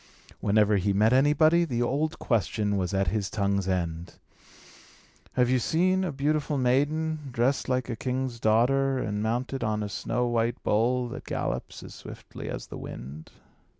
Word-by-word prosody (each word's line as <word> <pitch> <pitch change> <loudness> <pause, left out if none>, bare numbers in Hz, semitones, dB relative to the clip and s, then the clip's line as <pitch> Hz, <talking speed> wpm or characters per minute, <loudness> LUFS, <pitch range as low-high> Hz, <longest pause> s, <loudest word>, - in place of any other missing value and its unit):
Whenever 105 0 +3
he 100 +1 +1
met 110 +4 +3
anybody, 155 +5 +4
the 120 -7 -1
old 150 +6 -1
question 105 -2 0
was 95 -2 -1
at 95 -2 +1
his 100 0 -1
tongue's 100 -2 0
end: 85 -2 -2 1.2
"Have 125 -1 +3
you 130 +1 +2
seen 185 +8 +2
a 180 - -1
beautiful 145 +1 0
maiden, 145 +4 0
dressed 125 +4 0
like 130 -1 0
a 120 - -3
king's 125 -1 -3
daughter, 130 +5 +3
and 105 -4 -2
mounted 120 +4 -2
on 110 -2 -1
a 105 - -4
snow 120 +5 -1
white 120 0 0
bull, 120 +4 +1
that - - -8
gallops - - -4
as - - -10
swiftly - - -9
as - - -5
the - - -9
wind?" 70 +5 -8
120 Hz, 160 wpm, -27 LUFS, 105-135 Hz, 1.2 s, anybody